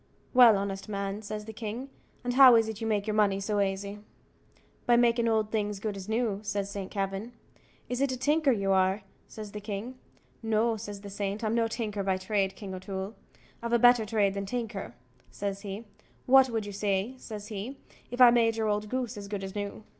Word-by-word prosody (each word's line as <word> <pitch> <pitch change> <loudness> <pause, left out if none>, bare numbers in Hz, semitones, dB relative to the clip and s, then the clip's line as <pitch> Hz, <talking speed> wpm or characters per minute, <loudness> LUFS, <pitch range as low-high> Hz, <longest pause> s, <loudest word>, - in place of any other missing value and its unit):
"Well, 240 -5 +8
honest 195 +1 -4
man," 200 0 -3
says 210 0 -6
the 220 - -8
king, 230 +5 -6 0.3
"and 245 0 -1
how 260 -2 +9
is 225 -1 +4
it 220 0 -6
you 225 - -2
make 210 -2 0
your 215 - -1
money 205 -2 +3
so 205 +1 -1
aisy?" 200 +1 -2 0.9
"By 240 - +6
makin' 235 -1 +3
old 220 -1 +1
things 210 -2 -1
as - - -9
good 210 0 -3
as 195 +1 -8
new," 220 -3 0
says 200 -1 -3
Saint 200 -2 -5
Kavin. 195 +3 -3 0.5
"Is 250 +1 -2
it 275 -1 +2
a 255 - -3
tinker 295 +3 +2
you 200 -4 0
are?" 190 +1 +2 0.2
says 215 -2 -9
the 210 - -7
king. 215 +5 -6 0.4
"No," 225 0 +1
says 205 -2 -7
the 200 -1 -9
saint; 200 +2 -3
"I'm 215 0 0
no 230 -1 +2
tinker 215 -3 -3
by 190 -1 0
trade, 195 0 -1
King 195 -3 -7
O'Toole; 190 +2 -5 0.5
I've 235 0 -3
a - - +6
better 245 -1 +6
trade 210 -2 +1
than 200 0 -3
a - - -11
tinker," 220 - -4 0.3
says 200 -1 -4
he 205 +2 -6 0.4
"what 265 0 +6
would 225 -3 -2
you 205 - -6
say," 200 +3 -1
says 210 -3 -8
he, 220 +6 -5 0.3
"If 245 - -6
I 250 -1 +9
made 230 -1 +3
your 220 -1 0
old 210 0 -1
goose 250 -2 -3
as 200 -1 -7
good 200 -1 -4
as 190 0 -6
new?" 205 +1 -5
210 Hz, 215 wpm, -29 LUFS, 200-230 Hz, 0.9 s, how